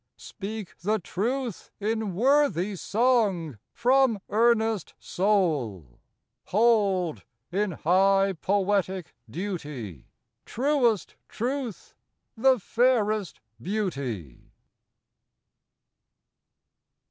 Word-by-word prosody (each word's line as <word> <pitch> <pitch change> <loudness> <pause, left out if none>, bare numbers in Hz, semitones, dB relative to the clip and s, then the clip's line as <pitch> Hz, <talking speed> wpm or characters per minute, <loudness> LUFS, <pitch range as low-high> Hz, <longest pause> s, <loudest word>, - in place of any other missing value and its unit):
speak 210 -1 -7
the 210 +4 +1
truth 230 +5 -3
in 215 -2 -2
Worthy 220 - +2
song 200 - +1
from 255 -2 +3
earnest 225 -2 +2
soul! 145 - -1 0.5
Hold, 200 -6 +2 0.3
in 200 0 0
high 195 +4 +3
poetic 190 -2 0 0.2
duty, 145 - -6 0.4
Truest 245 - 0
Truth 250 -2 -4 0.4
the 260 +3 +4
fairest 215 - +1 0.2
Beauty! 135 - -4
205 Hz, 65 wpm, -26 LUFS, 175-230 Hz, 0.5 s, the